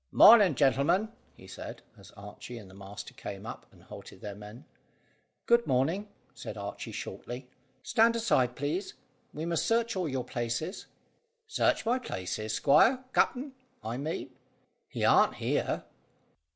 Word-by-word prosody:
"Mornin', 205 -8 +8
gentlemen," 150 +10 +3 0.3
he - - -14
said, 95 - -9
as - - -15
Archy 105 +4 -9
and 105 -4 -10
the 95 - -15
master 100 +1 -9
came 100 +1 -8
up, 115 - -8
and - - -20
halted - - -11
their 105 - -6
men. 105 +7 -11 0.8
"Good 235 0 +4
morning," 155 +11 +1 0.2
said - - -8
Archy - - -6
shortly. 125 +1 -7 0.4
"Stand 230 +1 +4
aside, 130 - +2
please; 155 +8 -3 0.4
we 155 +2 -5
must 170 -1 0
search 230 0 +1
all 180 -4 -1
your 130 -2 -2
places." 120 - -3 0.6
"Search 445 - +1
my 245 +3 +2
places, 110 - -4
squire 250 - +4
capt'n, 270 +3 +1 0.3
I 115 +2 -3
mean? 150 +4 -4 0.6
He - - -2
aren't - - +5
here." - - -1
140 Hz, 140 wpm, -30 LUFS, -, 0.8 s, Mornin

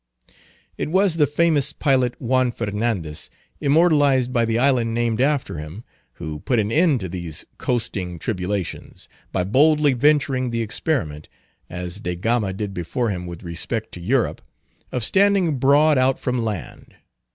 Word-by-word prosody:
It - - -2
was 185 0 +2
the 150 -2 +4
famous 150 -1 +1
pilot, 130 -5 +1
Juan 130 0 +1
Fernandez, 105 -8 -3 0.3
immortalized 145 -4 +3
by 120 -2 +2
the 115 0 0
island 120 -3 +2
named 120 0 0
after 140 - 0
him, 80 +9 -8 0.3
who 80 -3 -6
put 120 - 0
an 105 -1 0
end 155 - +3
to 95 - -3
these 85 -3 -5
coasting 105 -8 -2
tribulations, 95 +1 -4 0.2
by 90 - 0
boldly 145 - +4
venturing 130 -1 +2
the 115 -1 -1
experiment—as 90 - -5
De 90 -4 -3
Gama 110 +2 0
did 100 +1 -4
before 105 +7 -2
him 90 -2 -5
with 85 -1 -8
respect 105 +6 -4
to - - -8
Europe—of 120 +3 -3
standing 190 - +3
broad 145 +2 +4
out 130 +1 +3
from 125 -2 -1
land. 105 -7 -6
120 Hz, 140 wpm, -22 LUFS, 95-140 Hz, 0.3 s, the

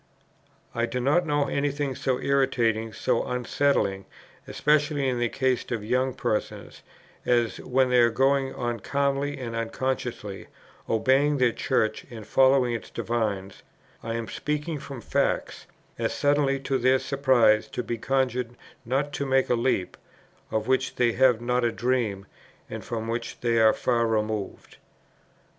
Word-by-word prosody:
I 120 0 0
do 125 +2 -3
not 150 +7 +2
know 145 -1 +1
any 140 +1 0
thing 140 -1 -2
so 130 0 -1
irritating, 120 -5 +1
so - - 0
unsettling, 125 -5 0 0.4
especially 150 -2 +1
in 125 -2 0
the 120 -1 +1
case 130 -1 -1
of 110 -3 -3
young 130 +2 0
persons, 110 -5 -3 0.4
as, 120 -2 +1
when 130 0 +1
they 125 - +5
are 120 0 +5
going 135 +3 +1
on 120 -3 -3
calmly 140 +3 -1
and 120 -3 -5
unconsciously, 115 -3 -3 0.4
obeying 135 +6 +3
their 125 -2 +3
Church 110 -1 0
and 110 -3 -9
following 130 +1 +3
its 115 - -5
divines, 105 -5 -3 0.4
(I 115 0 -4
am 115 -1 -4
speaking 150 +1 -3
from 135 -3 -8
facts,) - - -1 0.3
as - - -1
suddenly 145 -1 +2
to 135 0 -1
their 130 +2 +4
surprise 130 -6 +3
to 125 - -4
be 120 -1 -4
conjured 125 -2 -1 0.3
not 135 +4 -1
to 140 - -2
make 130 -1 +2
a - - +5
leap, 115 -6 0 0.5
of 110 +1 -2
which 130 0 +1
they 120 -1 +2
have 125 -1 +3
not 125 +1 0
a 120 - +2
dream 115 -6 -1 0.5
and - - -6
from 115 -1 -4
which 115 0 -4
they 115 -1 +2
are 110 -1 +6
far 115 -1 0
removed." 110 -2 -3
125 Hz, 150 wpm, -26 LUFS, 115-135 Hz, 0.5 s, are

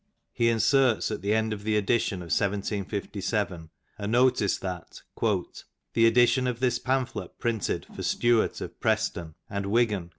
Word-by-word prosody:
He 115 -1 +2
inserts 120 +1 +3
at 105 - -4
the 100 +2 -1
end 110 0 +1
of 105 - -6
the 110 0 +1
edition 100 -3 0
of 85 - -10
1757 100 -2 -2 0.3
a 100 - -3
notice 120 -3 +3
that 90 -3 -7 0.2
"the 110 +2 -1
edition 120 +2 +4
of 120 -2 -2
this 125 -1 +1
pamphlet 130 -1 -2
printed 115 -5 -2
"for - - -6
Stuart 120 -2 +1
of - - -7
Preston 95 -7 -1
[and 100 -1 -4
Wigan? 105 -5 +1
110 Hz, 145 wpm, -27 LUFS, 100-120 Hz, 0.3 s, edition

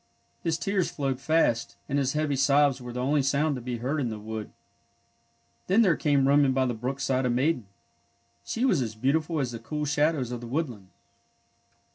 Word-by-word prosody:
His 165 -1 0
tears 195 0 0
flowed 135 -3 -2
fast, 135 -5 +1
and 140 +1 0
his 135 -1 0
heavy 150 -2 0
sobs 140 0 +3
were 125 0 -7
the 125 - -5
only 145 +2 +2
sound 140 +3 +1
to 125 - -6
be 120 0 -4
heard 135 +6 -2
in 125 - -1
the 110 - -5
wood. 110 0 -6 1.2
Then 200 +5 +5
there 180 -6 +4
came 140 -3 +2
roaming 140 -1 +4
by 130 0 +2
the 125 - -1
brook 125 +4 -4
side 135 -1 0
a - - 0
maiden. 125 -2 0 0.8
She 235 +3 -1
was 185 - +3
as 110 -3 -3
beautiful 155 +7 0
as 130 -3 -1
the 115 - -6
cool 150 +6 -4
shadows 145 -3 +1
of 120 -1 -5
the 120 - -7
woodland. 120 - -3
135 Hz, 195 wpm, -27 LUFS, 125-150 Hz, 1.2 s, Then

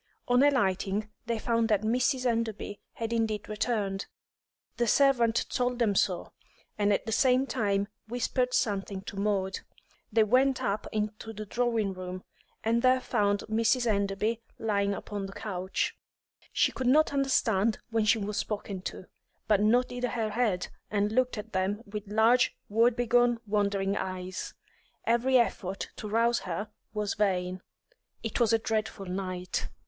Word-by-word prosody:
On 245 0 +4
alighting, 210 -6 +2 0.2
they 230 -1 0
found 230 0 +1
that 210 -1 +2
Mrs. 250 +3 +1
Enderby 225 -3 -1
had 230 0 -3
indeed 220 -2 -1
returned; 210 -3 -1 0.7
the 240 - +1
servant 240 -3 +4
told 250 0 0
them 230 -4 +2
so, 185 -2 0 0.4
and 205 -1 +2
at 200 - +1
the 225 - -3
same 255 +3 +4
time 205 -6 0 0.2
whispered 250 +2 0
something 200 -5 -1
to 200 - -8
Maud. 195 -1 0 0.5
They 220 +1 +5
went 255 +4 +3
up 205 +1 -1
into 215 +1 -3
the 215 0 -6
drawing 230 -3 0
room, 185 0 -6 0.4
and 230 +1 +2
there 255 0 +4
found 205 -5 +1
Mrs. 230 +3 +1
Enderby 210 +1 0 0.2
lying 200 -2 0
upon 200 -1 -5
the 195 - -10
couch. 190 -3 -2 0.6
She - - +3
could 260 - -3
not 300 +3 +4
understand 230 -6 +2
when 225 -1 +2
she 215 - +4
was 210 -1 -3
spoken 200 -3 -3
to, - - -11 0.4
but 210 -2 +4
nodded 245 +3 +2
her 225 -3 -1
head 210 -6 0 0.2
and 205 0 +1
looked 255 +1 +1
at 215 +1 -7
them 195 +4 -1
with 210 0 -6
large, 230 +4 +4
woebegone, 240 +2 +3
wandering 200 -1 0
eyes. 185 -1 -4 0.5
Every 240 +3 +3
effort 195 -5 -1
to 210 - -6
rouse 230 +2 +3
her 200 +5 -4 0.2
was 210 -1 -1
vain. 185 -2 0 0.6
It 225 - -2
was 235 -2 +4
a 225 - +5
dreadful 220 -2 -2
night. 185 -1 -3
215 Hz, 150 wpm, -29 LUFS, 200-235 Hz, 0.7 s, They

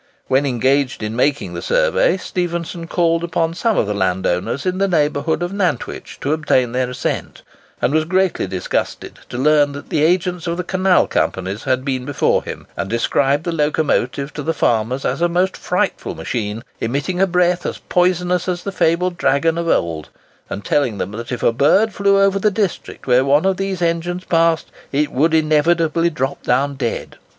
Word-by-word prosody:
When 135 +2 +2
engaged 130 +1 +1
in 105 +1 -3
making 145 +4 0
the - - -5
survey, - - +2
Stephenson 170 -2 -4
called 165 -1 +1
upon 165 -1 0
some 220 +4 0
of - - +2
the 105 - -2
landowners 95 +5 -1
in 185 0 -1
the 195 - +2
neighbourhood 155 -1 0
of 175 +2 -3
Nantwich 185 - -2
to 140 - 0
obtain 130 -6 +1
their 125 0 -1
assent, 125 - -4 0.4
and 140 - +1
was 155 0 +2
greatly 185 - +1
disgusted 95 -1 -3
to - - -5
learn 145 +1 +3
that 145 - -9
the 150 - 0
agents 175 +1 +1
of 170 0 -1
the 180 - -2
canal 185 +1 +3
companies 95 +3 -2
had 130 0 0
been 130 -2 -1
before 145 +2 +1
him, - - -7
and 95 - -3
described 135 +5 +1
the 170 - -2
locomotive 150 -3 0
to 150 - -5
the 165 +3 -2
farmers 120 +4 0
as 135 +6 -1
a 175 - +3
most 180 +2 +1
frightful - - -2
machine, 110 -1 -4 0.2
emitting 145 +10 -2
a 195 - +4
breath 180 0 +2
as - - -3
poisonous 180 0 +1
as 175 -1 -2
the 200 - -3
fabled 175 0 +1
dragon 140 +5 +2
of 170 0 -2
old; 80 - 0 0.4
and 100 - -6
telling 125 -8 +1
them 95 - -3
that 115 +3 -7
if 125 - -4
a 115 - +3
bird 195 - +3
flew 200 0 +3
over 195 0 +3
the 210 - +3
district 200 -2 -3
where 125 0 +4
one 145 +5 +3
of 190 -1 +2
these 195 -2 -2
engines 170 +2 -1
passed, 165 -1 +2 0.2
it 145 +1 0
would 160 +5 +2
inevitably 160 +2 +2
drop 135 -3 -3
down 135 +3 +1
dead! 130 -4 -4
155 Hz, 185 wpm, -19 LUFS, 130-180 Hz, 0.4 s, a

